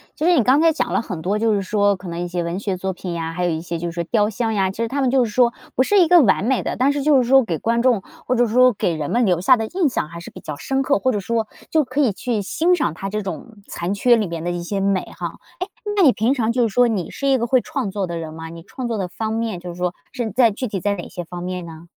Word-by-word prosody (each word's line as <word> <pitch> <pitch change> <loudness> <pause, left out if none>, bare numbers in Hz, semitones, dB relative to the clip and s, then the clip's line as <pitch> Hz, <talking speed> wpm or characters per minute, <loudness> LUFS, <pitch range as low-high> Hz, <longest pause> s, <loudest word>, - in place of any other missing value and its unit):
其 310 - -2
实 355 - +5
你 255 - +4
刚 260 +5 +4
才 330 0 +5
讲 - - -2
了 - - +1
很 175 -8 -6
多， 195 +5 0
就 220 0 +2
是 200 - +1
说 205 +1 +2
可 185 0 -11
能 170 0 -5
一 175 - -2
些 175 0 -2
文 170 +3 -3
学 200 -2 -2
作 190 +1 -3
品 180 -1 -6
呀， 165 -1 -3
还 180 +1 -1
有 175 - +1
一 160 0 -2
些 170 0 -4
就 170 +1 -3
是 - - -6
说 170 0 -3
雕 210 +3 +2
像 225 +1 -2
呀， 190 -2 +1
其 - - -14
实 230 0 -1
它 280 +4 -2
们 260 -2 +2
就 265 -1 +4
是 230 - -2
说， 240 +2 +3 0.2
不 260 - +4
是 405 +9 +3
一 350 - +5
个 355 +1 +7
完 205 -4 +3
美 260 +2 +1
的， - - -2
但 265 +3 +3
是 285 -1 -2
就 285 -4 +5
是 240 - -3
说 270 -1 +6
给 165 -8 -3
观 230 +1 +1
众， 245 -6 +3 0.2
或 255 - +1
者 245 0 +3
说 250 +3 +5
给 175 -4 -1
人 150 -2 -4
们 240 +1 +2
留 180 -4 +2
下 200 +8 +5
的 220 -1 -2
印 355 +3 +1
象 245 - -2
还 170 - -8
是 170 - -10
比 - - -11
较 150 - -6
深 270 - -1
刻， 280 +1 +2
或 260 - +1
者 210 - -1
说， 225 +2 -1 0.2
就 315 -1 +3
可 260 +2 -1
以 255 -6 +3
去 215 +3 -2
欣 335 - +2
赏 265 - -1
它 195 - -5
这 215 0 -2
种 195 +4 -7
残 175 +3 -3
缺 240 +4 +4
里 220 - 0
面 170 -2 -5
的 175 - -2
一 175 0 -3
些 195 +3 -3
美 195 -1 +1
哈。 170 -2 -5 0.2
哎， 365 - -2 0.3
那 405 - +3
你 300 -8 +7
平 235 +3 +1
常 230 -4 0
就 245 +1 +1
是 - - -5
说， 245 +2 +5
你 200 -7 -2
是 275 - -3
一 270 -1 +4
个 235 - -1
会 250 +1 +3
创 245 -7 -3
作 195 -1 -2
的 170 -1 -4
人 160 -1 -6
吗？ 160 0 -8
你 165 0 -10
创 245 +6 -6
作 230 - -2
的 190 -3 -2
方 220 +4 -4
面， 225 -5 -2
就 180 - -8
是 170 - -7
说 180 0 -2 0.2
是 240 -5 -3
在 240 +2 +4
具 225 +5 -4
体 205 -3 -3
在 200 +3 0
哪 175 - -7
些 175 - -6
方 175 +1 -8
面 180 -1 -4
呢？ 165 0 -11
210 Hz, 350 characters per minute, -21 LUFS, 175-250 Hz, 0.3 s, 个